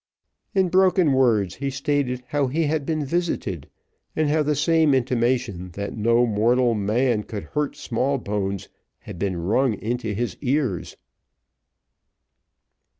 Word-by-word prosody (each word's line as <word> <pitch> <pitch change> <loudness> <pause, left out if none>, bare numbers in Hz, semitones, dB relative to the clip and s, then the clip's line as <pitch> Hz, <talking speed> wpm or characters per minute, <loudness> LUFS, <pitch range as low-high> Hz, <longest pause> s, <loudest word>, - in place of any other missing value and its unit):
In 190 -2 +3
broken 185 -4 +4
words 110 -8 +2
he 140 +5 -3
stated 135 -2 -1
how 145 -2 +1
he 155 +6 0
had 150 -1 -1
been 155 -2 -1
visited, 135 - -2 0.5
and 155 -2 +1
how 155 +1 +2
the 150 0 +1
same 155 0 +3
intimation 120 -6 0
that 100 +3 -5
no 115 +2 +3
mortal 120 +3 +2
man 110 +3 +1
could 105 -1 -6
hurt 150 -1 -2
Smallbones 105 -7 -2 0.3
had 85 - -9
been 95 -2 -1
rung 110 +8 +1
into 110 0 -3
his 120 +3 -3
ears. 130 - -1
125 Hz, 130 wpm, -23 LUFS, 105-145 Hz, 0.5 s, broken